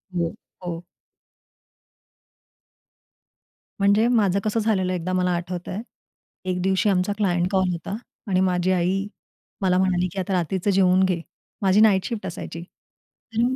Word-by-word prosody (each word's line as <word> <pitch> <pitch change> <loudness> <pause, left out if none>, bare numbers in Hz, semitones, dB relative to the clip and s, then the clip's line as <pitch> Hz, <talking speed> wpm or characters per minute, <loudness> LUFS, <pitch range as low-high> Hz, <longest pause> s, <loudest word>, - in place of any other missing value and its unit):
हो, 170 -1 0 0.3
हो. 170 0 -5 2.9
म्हणजे 200 +3 +4
माझं 205 -6 +3
कसं 215 +1 0
झालेलं 190 -4 +1
एकदा 180 +1 -2
मला 180 0 +2
आठवतंय. 180 +3 -4 0.6
एक 180 -1 -1
दिवशी 190 +2 +2
आमचा 190 +1 +1
क्लायंट 180 -4 +1
कॉल 190 -2 +2
होता 170 +4 -4 0.3
आणि 185 -2 +2
माझी 185 0 +2
आई 185 +2 +1 0.5
मला 185 -1 +3
म्हणाली 185 -1 +2
की 195 - -4
आता 190 +1 -2
रात्रीचं 185 +2 0
जेवून 185 0 +4
घे. 180 -3 0 0.4
माझी 195 0 +4
नाईट 195 -4 +5
शिफ्ट 225 -5 -4
असायची 170 -1 -6 0.7
आणि 240 +3 +2
185 Hz, 135 wpm, -24 LUFS, 180-200 Hz, 2.9 s, नाईट